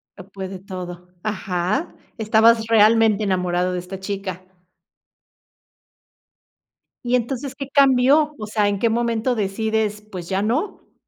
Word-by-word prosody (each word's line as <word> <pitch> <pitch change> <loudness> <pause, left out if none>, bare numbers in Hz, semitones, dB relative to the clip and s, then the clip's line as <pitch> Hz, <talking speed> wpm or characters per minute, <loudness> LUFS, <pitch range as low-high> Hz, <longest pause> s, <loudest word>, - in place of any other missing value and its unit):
Lo 190 -1 -12
puede 190 -1 -7
todo. 180 -2 -8 0.2
Ajá, 205 - -2 0.2
estabas 220 +1 +4
realmente 220 -1 +4
enamorado 180 -1 0
de 180 - -2
esta 185 +2 -8
chica. 190 -2 -5 2.6
Y 245 - +2
entonces, 255 +2 -2
¿qué 275 -1 -7
cambió? 275 +2 +4
O 215 - -5
sea, 210 -1 +1
¿en 200 -1 -2
qué 230 - +2
momento 235 +1 0
decides, 215 +1 -1
pues 185 -5 -9
ya 190 +1 0
no? 255 - -3
215 Hz, 125 wpm, -21 LUFS, 190-230 Hz, 2.6 s, estabas